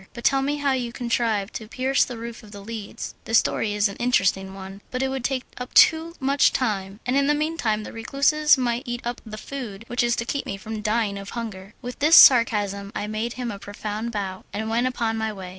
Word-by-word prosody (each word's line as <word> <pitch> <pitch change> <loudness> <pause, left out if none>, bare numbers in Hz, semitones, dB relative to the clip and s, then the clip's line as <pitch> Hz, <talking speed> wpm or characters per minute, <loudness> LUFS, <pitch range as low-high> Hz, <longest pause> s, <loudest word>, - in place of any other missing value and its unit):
But 235 - -8
tell 270 0 +3
me 285 +2 0
how 285 -1 +1
you 250 -3 -1
contrived 230 -4 -1
to 220 - -6
pierce 260 +4 +1
the 245 - -6
roof 235 0 -7
of 215 -3 -15
The 200 -1 -9
Leads." 215 0 -7
"The 225 - 0
story 215 -1 +2
is 205 +1 +3
an 200 - -8
interesting 195 -5 +1
one, 195 +1 -9
but 255 +1 -2
it 265 - 0
would 265 -2 -3
take 255 0 -1 0.2
up 250 - -7
too 325 +1 +5
much 275 +1 +3
time, 200 -5 -2
and 250 - 0
in 280 0 +3
the 295 - +3
meanwhile 295 -9 -1
the - - -9
recluses 280 +6 +3
might 240 -2 0
eat 240 0 -3
up 240 0 -4
the 215 0 -7
food 230 -5 -7
which 240 +1 -1
is 240 0 +2
to 235 - -3
keep 280 +3 -3
me 195 - -4
from 215 +2 -6
dying 210 -2 0
of 200 0 -8
hunger." 210 -3 -6
With 245 0 -6
this 305 +3 +6
sarcasm 205 -5 +6
I - - -2
made 215 +3 -3
him 245 -2 -4
a 200 - -7
profound 210 +3 -5
bow, 195 -3 -4
and 220 +1 -3
went 240 +2 +2
upon 230 -3 -1
my 220 0 -1
way. 190 -3 -8
230 Hz, 235 wpm, -24 LUFS, 205-255 Hz, 0.2 s, this